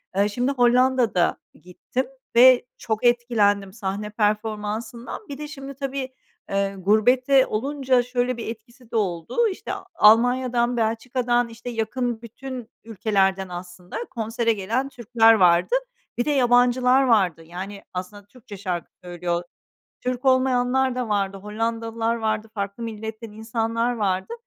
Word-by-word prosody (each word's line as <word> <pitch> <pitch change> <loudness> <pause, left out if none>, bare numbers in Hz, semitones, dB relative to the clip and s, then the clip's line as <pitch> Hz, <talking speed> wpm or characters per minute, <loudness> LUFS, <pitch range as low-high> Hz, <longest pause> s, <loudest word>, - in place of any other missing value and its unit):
Eee, 200 +1 +2
şimdi 245 +6 0
Hollanda'da 245 -6 +3 0.2
gittim 215 +8 -4 0.3
ve 250 +1 +7
çok 220 +1 -3
etkilendim 210 -5 +2
sahne 210 0 -4
performansından. 215 - -3
Bir 280 - -6
de 300 - -6
şimdi 275 -2 -8
tabii, 270 -1 -4 0.4
eee, 195 0 0
gurbette 250 +7 +4
olunca 260 +2 +1
şöyle 250 0 -1
bir 230 - -6
etkisi 235 +2 -10
de - - -5
oldu: 195 - 0
İşte, - - -7 0.2
Almanya'dan, 245 +1 +4
Belçika'dan, 240 +2 0
işte 235 +2 -8
yakın 235 0 -2
bütün 245 +1 -8
ülkelerden 195 -4 0
aslında 180 0 -8
konsere 230 0 -1
gelen 230 +7 -2
Türkler 235 -2 +4
vardı. 180 - +4 0.4
Bir 240 - 0
de 300 - +1
yabancılar 250 0 +4
vardı, 190 - +2
yani 190 +4 -8
aslında 190 +3 -6
Türkçe 215 -1 -12
şarkı 180 -3 -4
söylüyor. 175 0 -3 0.6
Türk 250 +1 -3
olmayanlar 260 0 +2
da 250 -3 -3
vardı, 195 -1 0
Hollandalılar 225 +2 -2
vardı, 220 -1 -2
farklı 200 +2 -4
milletten 220 0 -6
insanlar 225 +2 -1
vardı. 195 - -1
230 Hz, 130 wpm, -23 LUFS, 205-250 Hz, 0.6 s, ve